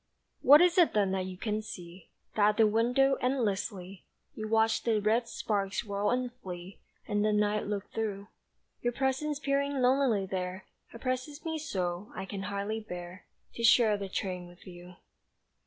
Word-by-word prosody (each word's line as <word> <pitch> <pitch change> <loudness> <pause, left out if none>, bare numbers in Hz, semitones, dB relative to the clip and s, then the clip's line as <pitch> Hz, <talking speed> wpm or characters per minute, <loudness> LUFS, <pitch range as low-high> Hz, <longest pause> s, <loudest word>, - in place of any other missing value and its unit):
What 290 +4 +8
is 355 0 +4
it 345 - +5
then 200 -2 +3
that 190 -1 -1
you 185 -1 -7
can 215 +2 -2
see 180 -4 -10 0.3
That 210 -1 +5
at 210 - -1
the 225 - +6
window 245 +5 +3
endlessly 205 -7 -2 0.3
You 215 -1 -5
watch 225 0 +2
the 225 -2 +1
red 225 +3 +1
sparks 200 -3 -2
whirl 200 0 -1
and 250 0 -1
flee 185 -5 -9 0.3
And 205 -1 +1
the 215 - +2
night 210 0 +1
look 205 -1 -4
through? 205 -3 -3 0.5
Your 240 0 0
presence 270 +3 0
peering 280 0 0
lonelily 250 -5 +3
there 185 0 -4 0.3
Oppresses 255 +6 -4
me 320 -1 -2
so, 185 - -3
I 190 - -4
can 195 0 -6
hardly 200 +2 -3
bear 180 -3 -9 0.3
To 235 - -6
share 225 -2 +6
the 200 -1 -5
train 180 -2 -3
with 175 0 -17
you. 180 0 -11
210 Hz, 170 wpm, -30 LUFS, 190-250 Hz, 0.5 s, What